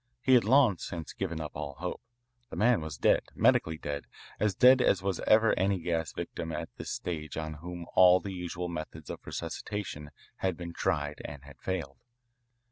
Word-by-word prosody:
He 130 Hz, -, +4 dB
had 120 Hz, -4 st, +6 dB
long 125 Hz, -5 st, +5 dB
since 85 Hz, -2 st, -6 dB
given 85 Hz, -4 st, -3 dB
up 75 Hz, -2 st, -5 dB
all 70 Hz, -1 st, -5 dB
hope. -, -, -5 dB, 0.5 s
The -, -, -7 dB
man 115 Hz, -3 st, +3 dB
was 80 Hz, -3 st, -6 dB
dead, -, -, +4 dB
medically 80 Hz, 0 st, +3 dB
dead, 75 Hz, -1 st, -4 dB, 0.3 s
as 105 Hz, -2 st, +1 dB
dead 125 Hz, +3 st, +7 dB
as 95 Hz, -, +3 dB, 0.3 s
ever 110 Hz, +1 st, +6 dB
was -, -, +4 dB
any 95 Hz, +1 st, +2 dB
gas 80 Hz, -2 st, -2 dB
victim 80 Hz, -1 st, -5 dB
at 75 Hz, -, -5 dB
this -, -, -6 dB
stage 80 Hz, -4 st, -4 dB
on 80 Hz, -1 st, -3 dB
whom 85 Hz, 0 st, -6 dB
all 90 Hz, 0 st, +7 dB
the 95 Hz, +1 st, -6 dB
usual 90 Hz, -1 st, -4 dB
methods 80 Hz, -2 st, -6 dB
of -, -, -6 dB
resuscitation 90 Hz, -8 st, -5 dB, 0.3 s
had 95 Hz, -3 st, -1 dB
been 85 Hz, -1 st, -6 dB
tried 75 Hz, -1 st, -1 dB
and 70 Hz, -1 st, -8 dB
had 70 Hz, -2 st, -14 dB
failed. 85 Hz, -8 st, -4 dB
85 Hz, 185 wpm, -30 LUFS, 80-95 Hz, 0.5 s, dead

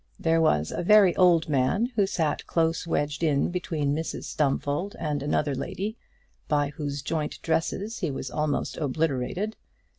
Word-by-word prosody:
There 165 Hz, 0 st, +2 dB
was 75 Hz, -, +2 dB
a -, -, -2 dB
very 195 Hz, 0 st, +6 dB
old 175 Hz, -3 st, +4 dB
man 150 Hz, -, +1 dB
who 200 Hz, -3 st, +3 dB
sat 165 Hz, -6 st, -1 dB
close 165 Hz, 0 st, 0 dB
wedged 145 Hz, -1 st, -1 dB
in 150 Hz, -1 st, +2 dB
between 155 Hz, -5 st, -1 dB
Mrs 160 Hz, +2 st, -3 dB
Stumfold 145 Hz, +6 st, -1 dB
and 150 Hz, -3 st, -2 dB
another 145 Hz, 0 st, 0 dB
lady, 195 Hz, -, -4 dB, 0.5 s
by 145 Hz, -1 st, +1 dB
whose 145 Hz, -1 st, -5 dB
joint 155 Hz, 0 st, -2 dB
dresses 195 Hz, +7 st, -1 dB
he 175 Hz, -, -1 dB
was 135 Hz, -2 st, -5 dB
almost 150 Hz, +2 st, -1 dB
obliterated. 155 Hz, +7 st, -1 dB
155 Hz, 150 wpm, -26 LUFS, 145-175 Hz, 0.5 s, very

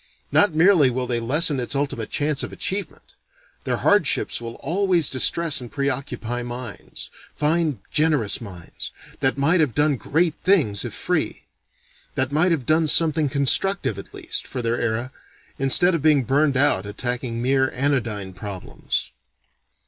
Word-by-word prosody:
Not 205 Hz, -6 st, +3 dB
merely 165 Hz, -4 st, +5 dB
will 125 Hz, +1 st, -2 dB
they 120 Hz, -1 st, -1 dB
lessen 145 Hz, +5 st, +3 dB
its 125 Hz, +3 st, -3 dB
ultimate 135 Hz, -6 st, -2 dB
chance 145 Hz, -1 st, 0 dB
of -, -, -4 dB
achievement; 190 Hz, -3 st, -5 dB, 0.5 s
their -, -, 0 dB
hardships -, -, +2 dB
will 115 Hz, 0 st, -7 dB
always 180 Hz, -2 st, 0 dB
distress 155 Hz, +3 st, +1 dB
and 120 Hz, -, -9 dB
preoccupy 135 Hz, -4 st, -3 dB
minds, 120 Hz, -3 st, -8 dB, 0.2 s
fine, 155 Hz, -2 st, 0 dB
generous 150 Hz, -11 st, +1 dB
minds, 90 Hz, -7 st, -7 dB, 0.3 s
that 135 Hz, +1 st, +1 dB
might 160 Hz, +6 st, +3 dB
have 145 Hz, -8 st, +1 dB
done 145 Hz, -2 st, +2 dB
great 160 Hz, +6 st, 0 dB
things 145 Hz, -, +2 dB
if -, -, -6 dB
free: -, -, -2 dB, 0.7 s
that 130 Hz, +1 st, 0 dB
might 160 Hz, +5 st, +2 dB
have 150 Hz, -7 st, -1 dB
done 160 Hz, +3 st, +2 dB
something 155 Hz, -1 st, +4 dB
constructive 140 Hz, -, +2 dB
at -, -, -11 dB
least, -, -, -5 dB
for 125 Hz, -2 st, -4 dB
their 115 Hz, +1 st, 0 dB
era, 120 Hz, +3 st, -2 dB, 0.5 s
instead 155 Hz, +7 st, +4 dB
of 165 Hz, -, -1 dB
being 150 Hz, -3 st, +4 dB
burned 140 Hz, +2 st, +2 dB
out 130 Hz, -9 st, +3 dB
attacking 120 Hz, +2 st, -3 dB
mere 130 Hz, +2 st, +2 dB
anodyne 120 Hz, -8 st, -2 dB
problems. 95 Hz, 0 st, -5 dB
135 Hz, 150 wpm, -22 LUFS, 120-155 Hz, 0.7 s, merely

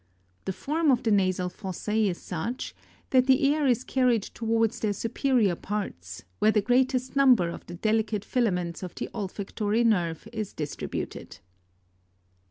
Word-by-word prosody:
The 190 Hz, -, -2 dB
form 310 Hz, -, 0 dB
of 250 Hz, -3 st, +3 dB
the 225 Hz, -, +1 dB
nasal 185 Hz, -2 st, +2 dB
fossa? 190 Hz, +2 st, -5 dB
is 210 Hz, -5 st, +2 dB
such, 225 Hz, +9 st, -4 dB, 0.4 s
that 255 Hz, -1 st, +4 dB
the 275 Hz, +2 st, +4 dB
air 300 Hz, -2 st, +1 dB
is 245 Hz, 0 st, +2 dB
carried 250 Hz, -6 st, +2 dB
towards 225 Hz, 0 st, 0 dB
their 215 Hz, -2 st, 0 dB
superior 230 Hz, -1 st, +1 dB
parts, 90 Hz, -, -5 dB, 0.2 s
where 215 Hz, -, +4 dB
the 215 Hz, -, +4 dB
greatest 255 Hz, +4 st, +1 dB
number 250 Hz, -11 st, +5 dB
of -, -, -7 dB
the 175 Hz, -, -7 dB
delicate 215 Hz, +1 st, 0 dB
filaments 180 Hz, -9 st, 0 dB
of 180 Hz, -2 st, -7 dB
the -, -, -4 dB
olfactory 205 Hz, +2 st, -1 dB
nerve 175 Hz, -8 st, +1 dB
is 215 Hz, -3 st, -4 dB
distributed. 150 Hz, -2 st, -5 dB
220 Hz, 150 wpm, -27 LUFS, 190-250 Hz, 0.4 s, number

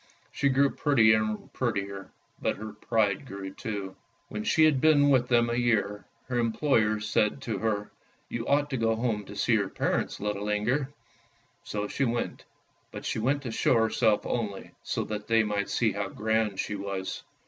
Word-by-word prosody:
She 140 Hz, -, +1 dB
grew 140 Hz, +1 st, +3 dB
prettier 110 Hz, -7 st, +4 dB
and 110 Hz, -1 st, -4 dB
prettier, 100 Hz, -5 st, -3 dB, 0.3 s
but -, -, 0 dB
her 110 Hz, 0 st, -7 dB
pride 105 Hz, +2 st, 0 dB
grew 95 Hz, -2 st, -7 dB
too. 100 Hz, -5 st, -5 dB, 0.3 s
When 105 Hz, 0 st, -4 dB
she 160 Hz, -, +3 dB
had 145 Hz, -4 st, +3 dB
been 145 Hz, -2 st, +5 dB
with 125 Hz, -2 st, +3 dB
them 120 Hz, -1 st, +3 dB
a 120 Hz, -, -1 dB
year, 110 Hz, -4 st, 0 dB, 0.2 s
her 125 Hz, -2 st, -1 dB
employers 110 Hz, -3 st, +1 dB
said 105 Hz, +3 st, +1 dB
to 115 Hz, -, -3 dB
her, 105 Hz, -2 st, -1 dB, 0.2 s
" -, -, -38 dB
You 115 Hz, -1 st, -4 dB
ought 145 Hz, +1 st, +2 dB
to 130 Hz, -, 0 dB
go 115 Hz, -1 st, +2 dB
home 110 Hz, -3 st, -1 dB
to 100 Hz, -, -10 dB
see 115 Hz, -, +1 dB
your 100 Hz, -3 st, +2 dB
parents, -, -, -1 dB
little 105 Hz, 0 st, -2 dB
Inger! 125 Hz, +7 st, 0 dB, 0.4 s
" -, -, -38 dB
So 105 Hz, 0 st, -2 dB
she 140 Hz, -, 0 dB
went, 120 Hz, -1 st, -2 dB, 0.5 s
but -, -, -8 dB
she -, -, -1 dB
went 140 Hz, +5 st, 0 dB
to 120 Hz, -, -4 dB
show 115 Hz, -, +2 dB
herself 110 Hz, -2 st, +2 dB
only, 105 Hz, -5 st, -3 dB
so -, -, -2 dB
that 105 Hz, -1 st, -5 dB
they 115 Hz, -1 st, +4 dB
might 105 Hz, -2 st, -1 dB
see 110 Hz, +2 st, +2 dB
how 100 Hz, 0 st, -3 dB
grand 110 Hz, -1 st, 0 dB
she -, -, -2 dB
was. 100 Hz, -1 st, -4 dB
110 Hz, 190 wpm, -28 LUFS, 105-120 Hz, 0.5 s, been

